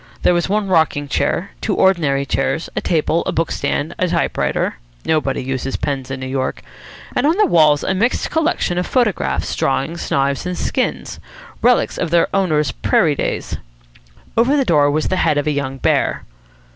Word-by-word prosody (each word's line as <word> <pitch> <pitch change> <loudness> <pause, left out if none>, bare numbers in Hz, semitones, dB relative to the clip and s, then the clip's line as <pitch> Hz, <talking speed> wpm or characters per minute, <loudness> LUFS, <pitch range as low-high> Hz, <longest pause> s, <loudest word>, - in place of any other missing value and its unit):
There - - +4
was 175 +1 0
one 210 0 0
rocking 160 -5 +1
chair, 185 +6 -1
two 210 - -1
ordinary 150 -8 +2
chairs, 135 +4 -1
a - - -1
table, 165 0 +1
a - - +1
book 165 +1 -1
stand, 155 +4 -2
a 185 - +2
typewriter 170 -1 -1 0.3
nobody 150 -5 0
uses 130 0 -3
pens 135 -3 -3
in 135 0 -4
New 130 - -5
York 130 0 -3 0.5
and - - +2
on 325 +4 +2
the 425 - +5
walls 155 -3 +4
a - - 0
mixed 225 +7 0
collection 320 - 0
of 180 - -2
photographs, 240 -7 0
drawings, 135 +5 -1
knives, 140 +4 0
and 180 -1 -3
skins, - - -2 0.4
relics 245 0 +2
of 170 - -1
their 170 +3 +2
owner's 155 -7 +1
prairie - - +2
days. - - -3 0.8
Over 255 +6 +3
the 275 - +2
door 145 -6 +4
was 155 +2 0
the 185 - 0
head 155 -4 +2
of 145 - 0
a 150 - +1
young 135 -2 -3
bear. - - 0
160 Hz, 180 wpm, -18 LUFS, 140-190 Hz, 0.8 s, the